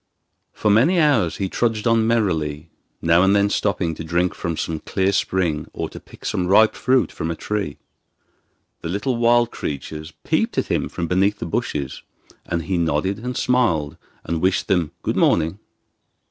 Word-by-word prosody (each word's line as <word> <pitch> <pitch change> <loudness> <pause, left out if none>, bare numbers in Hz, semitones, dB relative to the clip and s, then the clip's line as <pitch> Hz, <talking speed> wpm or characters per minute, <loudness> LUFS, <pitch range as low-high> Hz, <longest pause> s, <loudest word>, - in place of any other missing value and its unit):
For 105 - 0
many 155 - +4
hours 140 - +3
he 95 - -1
trudged 110 +1 -1
on 115 -1 +3
merrily, 80 -9 0 0.3
now 85 +1 +5
and 95 +2 +4
then 100 0 +3
stopping 95 -6 0
to 80 - -7
drink 85 +3 0
from 85 -3 -4
some 80 -1 -2
clear 95 +3 0
spring 90 -5 0
or - - -4
to - - -10
pick - - -16
some 90 - -1
ripe 110 +4 +5
fruit 130 -2 +1
from 80 - -4
a 85 - -2
tree. 100 -5 -3 1.0
The 80 - -5
little 100 +8 -1
wild 120 0 +3
creatures 75 +2 -5
peeped - - 0
at - - -1
him - - 0
from 85 - -3
beneath 95 +4 +2
the - - -5
bushes, 70 -4 -3 0.5
and 85 -1 -2
he 95 0 -1
nodded 85 +5 0
and 125 +2 -4
smiled, 90 - +1 0.3
and 85 -1 -2
wished 95 0 +1
them 90 -5 +1
'Good - - -1
morning. 80 +4 +2
95 Hz, 175 wpm, -21 LUFS, 80-110 Hz, 1.0 s, now